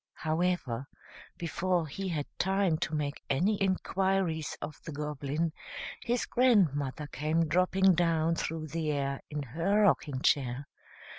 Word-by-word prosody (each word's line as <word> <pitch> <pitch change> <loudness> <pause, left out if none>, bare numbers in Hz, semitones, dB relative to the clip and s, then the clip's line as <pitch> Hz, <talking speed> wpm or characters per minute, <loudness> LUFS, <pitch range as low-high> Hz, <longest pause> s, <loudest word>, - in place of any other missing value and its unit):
However, 155 -6 -1 0.5
before 170 +1 0
he 190 +6 -5
had 150 -4 -1
time 190 -4 +2
to 155 - -1
make 145 -1 -2
any 190 +10 +2
inquiries 190 -4 0
of 150 - -7
the 160 - -6
Goblin, 150 +2 -2 0.5
his 240 0 0
grandmother 155 - +2
came 155 +3 0
dropping 185 +3 +4
down 165 -1 +2
through 160 -1 -3
the 155 0 -1
air 140 -1 -1
in 150 -1 -3
her 170 - +1
rocking 150 -8 +2
chair. 135 -1 +1
160 Hz, 130 wpm, -30 LUFS, 145-185 Hz, 0.5 s, dropping